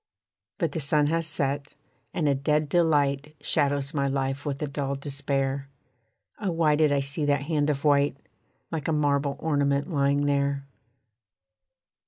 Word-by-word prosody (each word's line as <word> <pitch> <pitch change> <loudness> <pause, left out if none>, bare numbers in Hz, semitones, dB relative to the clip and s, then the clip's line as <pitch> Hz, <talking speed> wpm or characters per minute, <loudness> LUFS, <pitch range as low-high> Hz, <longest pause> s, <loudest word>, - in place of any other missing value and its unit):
But 165 -3 0
the 160 - -3
sun 150 0 +2
has 165 -1 +2
set, 140 -1 -2 0.4
and 160 -4 0
a 140 - +4
dead 150 +2 0
delight 150 -3 +2
Shadows 140 -2 0
my 140 -2 +1
life 135 +1 -2
with 140 -1 -2
a - - -1
dull 140 -1 -2
despair, 140 -1 -2 0.7
Oh 205 -3 -1
why 165 -3 +2
did 155 -1 +3
I 140 -1 +2
see 140 +3 -1
that 145 -1 +1
hand 150 -1 0
of 140 -2 -1
white, 145 -2 +3 0.5
Like 160 -4 -3
a 160 - +1
marble 140 -2 +1
ornament 145 0 0
lying 140 0 +2
there? 140 -1 0
145 Hz, 155 wpm, -26 LUFS, 140-150 Hz, 0.7 s, a